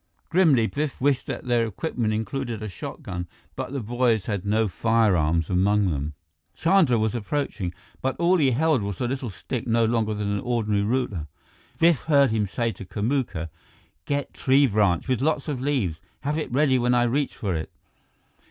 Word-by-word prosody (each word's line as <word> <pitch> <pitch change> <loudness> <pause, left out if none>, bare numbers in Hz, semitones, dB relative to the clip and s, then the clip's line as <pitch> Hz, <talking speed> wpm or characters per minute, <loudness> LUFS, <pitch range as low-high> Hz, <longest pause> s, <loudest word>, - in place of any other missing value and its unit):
Grimly, 160 -10 +4
Biff 145 +4 -3
wished 135 -1 +1
that - - -5
their 120 -2 +2
equipment 115 - -2
included 110 +1 -3
a - - -3
shotgun, 90 -1 -6 0.3
but - - -4
the 140 - -2
boys 115 -2 +1
had 100 -3 -3
no 110 +1 +2
firearms 90 -7 +2
among 100 +1 +2
them. 75 0 -3 0.4
Chandra 165 -8 +3
was 110 0 0
approaching, 115 -5 -2 0.3
but 135 0 -1
all 175 +2 +3
he 145 -5 +3
held 145 +1 +2
was 100 -2 -4
a 125 - 0
little 130 -1 -3
stick 110 +7 -5
no 115 0 +3
longer 110 -2 0
than 105 -1 -2
an 100 - 0
ordinary 110 -4 0
ruler. 105 - -1 0.5
Biff 165 -4 +3
heard 140 -5 +4
him 110 -2 0
say 115 +4 -1
to 110 - -9
Kamuka: 105 - -2 0.6
"Get 145 -1 -2
tree 135 +2 +4
branch 100 -7 +2
with 130 -2 0
lots 150 0 0
of 140 -5 -3
leaves 125 - -1 0.2
have 145 +2 -1
it 155 - -3
ready 130 0 +3
when 125 +1 +2
I 120 - +4
reach 135 +4 0
for 100 -7 -2
it." 80 -1 -4
115 Hz, 180 wpm, -25 LUFS, 100-135 Hz, 0.6 s, Grimly